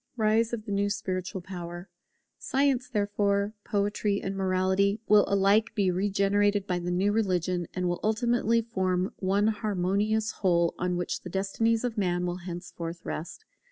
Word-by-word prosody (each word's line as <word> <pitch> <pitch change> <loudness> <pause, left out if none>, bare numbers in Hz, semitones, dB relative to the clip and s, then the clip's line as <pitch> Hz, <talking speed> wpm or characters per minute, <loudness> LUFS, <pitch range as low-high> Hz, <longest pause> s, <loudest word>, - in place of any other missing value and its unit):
[Rise 220 +1 +2
of 225 -3 -4
the 205 - -5
new 200 0 +1
Spiritual 190 -2 -3
power] 175 0 -7 0.5
Science, 270 -2 +1
therefore, 205 -1 0
Poetry, 205 0 0
and 195 0 -4
Morality, 190 +2 +1
will 210 -1 +6
alike 200 +3 +3
be 195 -3 +2
regenerated 200 +1 +1
by 180 -2 -1
the 175 0 -4
new 185 +3 +2
religion, 185 -5 0
and 180 -1 0
will 175 0 -1
ultimately 230 +1 +2
form 185 -4 -1
one 195 +2 +1
harmonious 210 +1 0
whole, 170 -3 +1
on 180 0 0
which 175 - -3
the 180 - -8
destinies 220 +5 0
of 240 -3 -2
Man 180 -2 0
will 175 0 -2
henceforth 175 -1 -7
rest. 160 - -6
200 Hz, 155 wpm, -28 LUFS, 180-210 Hz, 0.5 s, will